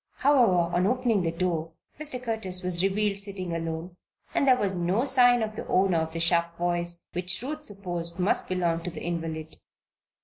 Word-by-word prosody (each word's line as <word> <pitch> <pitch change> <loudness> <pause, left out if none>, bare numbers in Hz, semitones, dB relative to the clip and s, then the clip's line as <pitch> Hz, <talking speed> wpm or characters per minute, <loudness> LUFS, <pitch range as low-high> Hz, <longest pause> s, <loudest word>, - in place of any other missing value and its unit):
However, 220 -12 +3
on 180 +2 +3
opening 240 -3 +1
the 165 - 0
door, 165 -1 -2 0.3
Mr. 295 -4 -1
Curtis 220 -7 -3
was 180 -1 0
revealed 200 +1 +1
sitting 195 -3 -2
alone 165 +2 -5 0.4
and 280 - +1
there 255 -1 +6
was 200 -5 -1
no 185 +7 0
sign 245 -3 +5
of 215 -1 -4
the - - -6
owner 185 -3 +3
of 160 0 -2
the 165 - -4
sharp 170 0 +2
voice, 175 0 -2
which 180 +1 0
Ruth 305 +3 -4
supposed 175 - -5
must 185 +2 +1
belong 170 -2 0
to 175 - -4
the - - -8
invalid. 160 -2 -4
180 Hz, 180 wpm, -27 LUFS, 170-215 Hz, 0.4 s, there